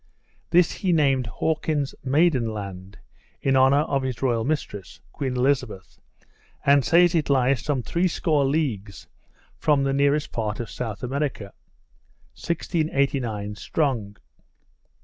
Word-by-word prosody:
This 175 0 +4
he 190 - -1
named 135 -7 +2
Hawkins's 150 - -1
Maiden 135 -3 +2
Land, 100 -2 -8 0.4
in 135 -1 +1
honour 135 +2 +5
of 140 -3 -1
his 130 -3 -4
royal 120 -4 0
mistress, 130 -9 -4
Queen 130 -3 -3
Elizabeth, 125 -7 -1 0.7
and 140 -1 +5
says 170 +8 +4
it 160 -4 0
lies 135 -2 +2
some 140 -5 -1
threescore 170 -3 +1
leagues 120 - -2 0.5
from 145 -3 +2
the 135 0 0
nearest 140 +2 +1
part 110 -2 -3
of 120 - -5
South 115 -1 -5
America. 130 -6 -3 0.8
1689 140 - -1
Strong. 115 -8 -2
135 Hz, 120 wpm, -24 LUFS, 115-150 Hz, 0.8 s, honour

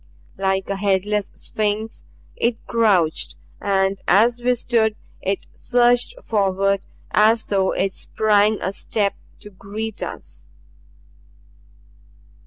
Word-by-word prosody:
Like 190 -1 0
a 195 - -2
headless 200 +1 0
Sphinx 215 +1 -3 0.3
it 235 -1 0
crouched 195 -9 +2 0.3
and 195 -1 +1
as 230 +6 +4
we 250 +1 +2
stood 225 -2 +1 0.3
it 195 +1 -2
surged 245 - +2
forward 195 -2 0 0.2
as 220 +1 +4
though 195 -2 +1
it 195 -1 0
sprang 215 +1 +2
a 190 - -2
step 200 0 -1 0.3
to 210 - -10
greet 210 +3 -6
us. - - -8
205 Hz, 105 wpm, -21 LUFS, 195-220 Hz, 0.3 s, as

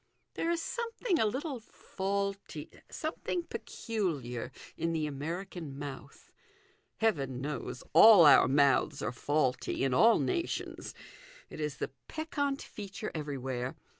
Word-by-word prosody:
There 330 - -1
is 340 -1 0
something 465 -5 -1
a 220 - +4
little 265 +4 -3
faulty, 200 -6 -4 0.2
something 330 +2 -3
peculiar, 175 - -3 0.2
in 165 0 -1
the 155 -2 0
American 160 +1 -5
mouth. 140 -1 -9 0.7
Heaven 140 - 0
knows 140 -2 -4
all 210 -7 +9
our 145 - +8
mouths 140 -3 +3
are 110 - -1
faulty 135 0 0
in 135 -2 +1
all 225 - +6
nations 350 -2 -2 0.6
it - - -8
is 150 -2 -2
the - - -3 0.2
peccant 285 -3 -2
feature 205 +1 -7
everywhere. 130 -4 -3
165 Hz, 120 wpm, -31 LUFS, 140-230 Hz, 0.7 s, all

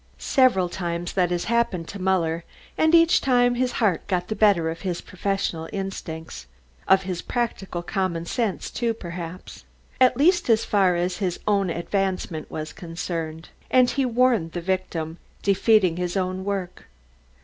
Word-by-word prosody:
Several 250 -9 +3
times 175 -1 -4
that 180 -3 +2
has 175 -1 -1
happened 230 -8 0
to 200 - -7
Muller, 170 -3 +1 0.3
and 315 +1 +4
each 330 0 +5
time 245 -2 +3
his 250 +1 0
heart 200 -8 0
got 180 -2 -1
the 215 - -1
better 195 -6 +3
of 165 - -8
his 180 -3 -2
professional 185 -4 -3
instincts, 160 - -6 0.4
of 190 0 +5
his 180 -2 -4
practical 195 -7 -3
common 170 -2 -2
sense, 215 +1 -2
too, 235 -2 -1
perhaps,... 175 -2 -8 0.4
at 255 -1 +5
least 350 +2 +3
as 225 -1 +4
far 190 -4 +3
as 180 +1 -1
his 185 -4 -2
own 200 -3 +2
advancement 180 -2 -2
was 155 -1 -5
concerned, 165 -1 -5 0.2
and 255 -1 +4
he 275 - 0
warned 240 -8 +2
the 175 - -2
victim, 170 -3 -3 0.2
defeating 200 -3 +3
his 180 +1 -2
own 185 0 -2
work. 190 -2 -4
185 Hz, 155 wpm, -24 LUFS, 170-220 Hz, 0.4 s, each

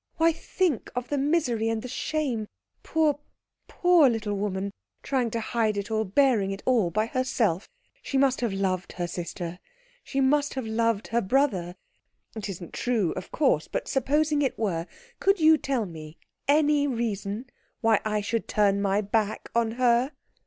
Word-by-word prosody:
Why, 330 0 +4
think 330 - -1
of 250 0 -3
the 290 - 0
misery 270 -7 +1
and 225 -1 -2
the - - -5
shame 260 -4 -2 0.3
poor, 310 -3 +1 0.5
poor 355 -6 +5
little 220 -3 -2
woman 200 -1 -2 0.3
trying 255 -4 0
to 230 - -2
hide 220 -2 0
it 200 +2 -4
all, 220 0 +1
bearing 215 -1 +3
it 195 0 -5
all 230 -9 +3
by 215 +6 0
herself 225 -7 0 0.3
she 275 - -2
must 265 -1 +3
have 235 -3 0
loved 190 -2 -1
her 175 - -2
sister, 175 0 -5 0.4
she 275 - -3
must 285 +2 +2
have 260 -3 -3
loved 220 -1 0
her 235 +1 +1
brother. 190 -6 +1 0.6
It 215 -2 -5
isn't 175 -3 -7
true, 225 -8 0
of - - -7
course, 260 - +2
but - - -3
supposing 295 +3 +1
it 270 - 0
were, 175 -6 -1 0.3
could 395 0 +3
you 315 0 +7
tell 270 -7 -1
me 160 -3 -10 0.3
any 295 0 +4
reason 225 -3 -2 0.4
why 225 -3 +4
I 215 -1 0
should 205 +2 -2
turn 200 -1 +2
my 200 +1 +2
back 215 +1 -1
on 230 -1 +1
her?" 245 +3 +2
230 Hz, 165 wpm, -26 LUFS, 200-275 Hz, 0.6 s, you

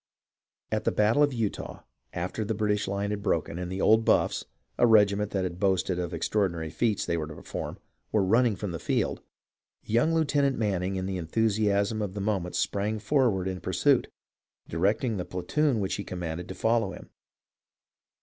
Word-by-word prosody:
At - - 0
the - - +3
battle 110 +6 +3
of 145 - +5
Eutaw, 115 -5 -3 0.3
after 90 +5 -3
the 110 +1 -2
British 105 -1 0
line 100 +1 -2
had 105 -1 -3
broken, 85 -3 -1
and 90 0 -4
the 95 - -3
0/d 110 +1 +5
B/zj^s - - -8
(British), - - +1 0.4
a 120 - +6
regiment 105 -2 +4
that 95 -2 -1
had 90 -1 -4
boasted 95 -2 +1
of 90 -1 -2
the 85 - -5
extraordinary 85 -3 -1
feats 105 +6 0
they 85 - 0
were 75 -2 -3
to 75 - -9
perform, - - -6 0.3
were 105 -2 +3
run 115 +7 +4
ning 115 -4 +1
from 100 -1 -4
the 85 - -5
field, - - -1 0.6
young 120 +9 +2
Lieutenant 145 -4 +2
Manning 95 -3 -1
in 95 0 -2
the 95 -1 -2
enthusiasm 105 +3 +1
of 100 -2 -3
the - - -3
moment 95 -3 -1
sprang 105 +2 0
forward 110 -5 +1
in 95 -2 -4
pursuit, - - +2 0.6
directing 105 +7 0
the 90 - -2
platoon 115 - 0
which 95 -2 -1
he 100 - -3
commanded 90 -2 -5
to 95 - -6
follow 110 -4 +1
him. - - -12
100 Hz, 190 wpm, -28 LUFS, 90-110 Hz, 0.6 s, a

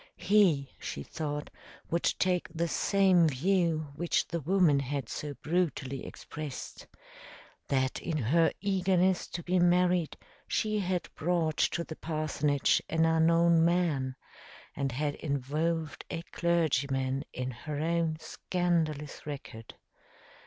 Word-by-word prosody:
He, 180 -8 +3
she 70 - -5
thought, 150 - -4 0.4
would 170 +1 +1 0.2
take 180 -1 +1
the 170 +1 -1
same 185 -1 +4
view 160 +1 +1
which 170 +2 0
the 170 - -2
woman 165 -2 +3
had 140 -2 -3
so 145 +3 -5
brutally 150 -6 -1
expressed 150 -3 -8 0.8
that 130 -1 0
in 165 -3 -2
her 155 +6 +3
eagerness 190 -2 +2
to 170 - -6
be 180 +2 +1
married, 175 -1 +3 0.3
she 215 -1 0
had 180 -2 -1
brought 160 -2 0
to 170 - +1
the 160 - -8
parsonage 155 -3 +1
an 165 0 +2
unknown 165 +1 +4
man 165 -7 +1 0.6
and 135 -1 -1
had 145 +4 -1
involved 155 +3 -2
a 165 -1 -4
clergyman 140 -6 +1
in 125 0 -4
her 145 +4 -6
own 165 0 0
scandalous 160 -6 -2
record. 125 -6 -8
160 Hz, 120 wpm, -30 LUFS, 145-175 Hz, 0.8 s, same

